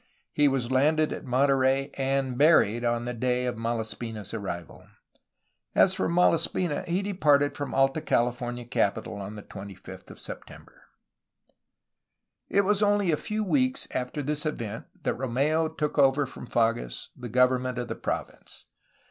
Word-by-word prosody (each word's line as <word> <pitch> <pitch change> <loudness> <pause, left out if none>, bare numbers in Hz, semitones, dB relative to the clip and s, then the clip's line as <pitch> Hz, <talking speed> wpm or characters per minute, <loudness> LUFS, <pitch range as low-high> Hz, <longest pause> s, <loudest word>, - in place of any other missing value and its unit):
He 145 - +4
was 130 -3 0
landed 155 +4 +3
at - - -7
Monterey 135 +1 +2
and 135 -1 0
buried 120 -6 +4
on 120 0 0
the 125 - -3
day 125 +1 0
of 125 - -2
Malaspina' 115 -1 -3
s 100 - -6
arrival. 90 -6 -6 0.9
As 190 - +5
for - - -1
Malaspina 170 -2 +2
he 180 +3 0
departed 150 -8 +2
from 145 - -4
the - - -4
Alta 135 +3 +3
Cali 120 -5 +2
fornia 120 -1 -6
capital 105 -2 0
on 100 +1 -7
the 105 - -9
25th 100 -1 -10
of - - -12
September. - - -11 1.6
It 200 - +4
was 200 +1 +1
only 205 -3 +3
a - - +3
few 215 +7 -3
weeks 255 +5 +1
after 130 +4 -3
this 150 +1 -2
event 115 -8 -4 0.2
that - - -1
Romeu 140 +6 +1
took 150 -1 -1
over 140 +1 +4
from 125 - -10
Fages 115 - -1
the 125 -1 -8
government 125 +1 +2
of 120 -1 -3
the - - -3
province. - - -6
130 Hz, 155 wpm, -27 LUFS, 120-155 Hz, 1.6 s, As